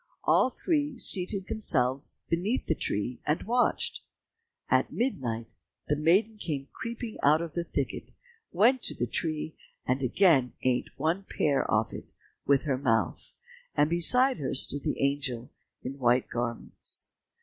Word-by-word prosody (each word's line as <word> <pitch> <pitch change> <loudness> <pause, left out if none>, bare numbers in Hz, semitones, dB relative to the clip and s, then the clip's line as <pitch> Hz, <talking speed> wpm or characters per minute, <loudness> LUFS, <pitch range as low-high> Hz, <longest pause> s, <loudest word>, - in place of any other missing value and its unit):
All - - +4
three 290 0 -1
seated 190 -1 +3
themselves 135 - +1
beneath 190 +9 -1
the - - +1
tree 120 -3 -3
and 150 +2 -1
watched. 245 +3 0 0.6
At - - +2
midnight 120 - -3 0.4
the 150 - +3
maiden 190 +9 +2
came 140 -7 -4
creeping 230 -1 -6
out 150 +2 +5
of 170 -2 -5
the 170 - -2
thicket, 140 -5 -4 0.4
went 235 +8 +3
to - - -5
the - - -1
tree, 155 -1 -3 0.3
and 130 +2 0
again 135 - +3
ate 125 -1 +1
one 170 +5 0
pear 140 -3 0
off - - +1
it - - -9 0.4
with 140 -1 +3
her 135 -4 -1
mouth, 115 -4 -1 0.4
and 150 +2 +3
beside 250 +10 +4
her 140 -4 -3
stood 140 +2 +3
the - - -2
angel 135 -4 -1 0.3
in 135 +2 -6
white 125 0 +2
garments. 120 0 -2
150 Hz, 145 wpm, -28 LUFS, 130-200 Hz, 0.6 s, out